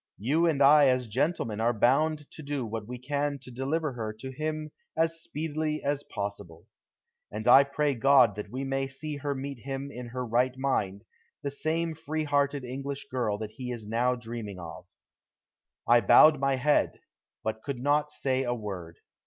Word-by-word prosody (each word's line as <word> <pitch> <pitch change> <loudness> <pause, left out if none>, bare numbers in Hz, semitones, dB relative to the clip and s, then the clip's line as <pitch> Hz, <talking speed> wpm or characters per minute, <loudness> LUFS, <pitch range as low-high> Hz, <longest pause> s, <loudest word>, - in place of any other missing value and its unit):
You 150 +11 +2
and 145 -4 +3
I 145 0 +7
as 125 -1 +2
gentlemen 115 -2 -1
are 120 +1 +2
bound 150 +7 +2
to - - -9
do 140 -3 -3
what 110 -1 -5
we 125 +1 -6
can 145 +3 -2
to 130 -1 -13
deliver 140 +4 -1
her 110 -3 -4
to 130 +5 -8
him 155 +2 -4 0.3
as 165 0 +1
speedily 155 -1 -3
as 145 0 0
possible. 100 -5 -6 0.7
And 110 +2 -5
I 135 +3 +9
pray 145 +1 0
God 130 -2 +5
that 105 - -6
we 130 +2 -4
may 135 0 -1
see 145 +2 -5
her 140 0 -2
meet 135 -1 -5
him 135 +3 -5
in 125 -2 -7
her 125 +1 -4
right 125 +3 +1
mind, 105 -7 -1 0.4
the 140 - -2
same 160 +3 -1
free 155 0 -3
hearted 145 -2 +1
English 135 +2 -5
girl 120 -5 0
that 110 0 -6
he 125 +2 -7
is 115 -4 -6
now 120 +3 +1
dreaming 115 -4 -6
of." 85 -2 -9 1.0
I 120 0 +6
bowed 155 +3 +7
my 135 0 +2
head, 145 +3 +2 0.4
but 110 0 -3
could 140 0 -4
not 145 +3 +2
say 130 -3 -1
a 120 -2 -1
word. 95 -7 -7
135 Hz, 180 wpm, -28 LUFS, 120-145 Hz, 1.0 s, I